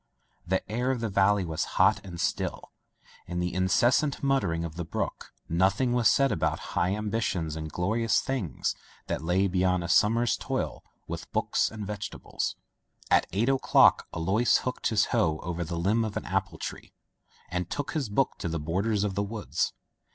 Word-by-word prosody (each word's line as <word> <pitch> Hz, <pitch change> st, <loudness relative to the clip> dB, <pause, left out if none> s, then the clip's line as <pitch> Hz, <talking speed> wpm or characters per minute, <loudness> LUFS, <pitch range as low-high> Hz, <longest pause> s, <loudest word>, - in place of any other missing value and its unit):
The 95 Hz, +1 st, 0 dB
air 120 Hz, +5 st, -1 dB
of 130 Hz, -2 st, 0 dB
the 115 Hz, -1 st, -2 dB
valley 100 Hz, 0 st, +3 dB
was 80 Hz, -2 st, -2 dB
hot -, -, +4 dB
and 90 Hz, -3 st, -8 dB
still. -, -, -2 dB, 0.6 s
In 90 Hz, 0 st, -3 dB
the 90 Hz, 0 st, -1 dB
incessant 120 Hz, +12 st, +2 dB
mut 135 Hz, -1 st, +3 dB
ter -, -, -1 dB
of 80 Hz, -1 st, -7 dB
the 85 Hz, -, -3 dB
brook 80 Hz, -, -4 dB, 0.2 s
nothing 95 Hz, +9 st, +2 dB
was 120 Hz, -3 st, +4 dB
said 135 Hz, -1 st, +3 dB
about 80 Hz, 0 st, -2 dB
high 90 Hz, +3 st, +1 dB
ambitions 105 Hz, -7 st, -2 dB
and 80 Hz, -1 st, -4 dB
the -, -, -8 dB
glorious 110 Hz, +8 st, +1 dB
things 110 Hz, -, -2 dB, 0.3 s
that -, -, -3 dB
lay 90 Hz, +4 st, +2 dB
beyond 90 Hz, -1 st, +1 dB
a -, -, -3 dB
summer's 115 Hz, +6 st, +3 dB
toil -, -, -3 dB, 0.2 s
with -, -, -7 dB
books -, -, +1 dB
and 110 Hz, -2 st, -6 dB
vegetables. 100 Hz, 0 st, -4 dB, 0.6 s
At -, -, +4 dB
eight 110 Hz, +5 st, +1 dB
o'clock 135 Hz, -1 st, +4 dB
Alois 95 Hz, +8 st, +2 dB
hooked 125 Hz, -, -2 dB
his 105 Hz, -2 st, +3 dB
hoe 85 Hz, -10 st, +2 dB
over 85 Hz, 0 st, -3 dB
the 85 Hz, +1 st, -4 dB
limb 105 Hz, +7 st, +2 dB
of 110 Hz, -2 st, -3 dB
an -, -, -4 dB
apple -, -, -1 dB
tree, -, -, -7 dB, 0.6 s
and 90 Hz, 0 st, -2 dB
took 145 Hz, -2 st, -3 dB
his 145 Hz, -8 st, -2 dB
book 125 Hz, +6 st, 0 dB
to 85 Hz, -, -3 dB
the 85 Hz, 0 st, -2 dB
border 95 Hz, +9 st, -1 dB
of 105 Hz, -1 st, 0 dB
the 100 Hz, -, 0 dB
woods. 105 Hz, +1 st, -2 dB
100 Hz, 180 wpm, -28 LUFS, 85-115 Hz, 0.6 s, hot